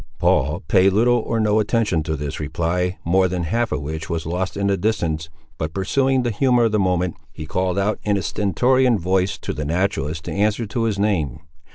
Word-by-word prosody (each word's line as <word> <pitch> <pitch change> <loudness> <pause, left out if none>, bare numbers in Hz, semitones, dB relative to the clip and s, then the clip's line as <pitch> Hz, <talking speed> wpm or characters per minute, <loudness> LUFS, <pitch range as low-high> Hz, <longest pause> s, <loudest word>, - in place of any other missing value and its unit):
Paul - - +1
paid 95 +2 +4
little 120 +4 +3
or 115 0 -2
no 105 0 +2
attention 105 -5 +1
to 80 0 -2
this 70 -1 -5
reply, 85 +5 -1
more 95 +2 +3
than 90 -1 -2
half 115 +8 -1
of 75 -1 -2
which 80 +3 -5
was 85 -2 -2
lost 90 +4 -3
in 100 - -1
the 100 0 +2
distance, 85 -6 -1 0.3
but 80 0 -3
pursuing 130 +7 +1
the 120 - 0
humour 125 +2 +3
of 115 - +2
the 105 - +1
moment, 90 -2 0
he - - -8
called 90 0 -1
out 100 +2 0
in 105 -1 +1
a 95 - -3
stentorian 120 +7 +2
voice 95 +2 0
to - - -5
the 75 - -4
naturalist 80 -1 -1
to - - -4
answer 105 +3 0
to 115 +2 -2
his 110 -3 0
name. 85 -8 0
95 Hz, 210 wpm, -21 LUFS, 85-110 Hz, 0.3 s, paid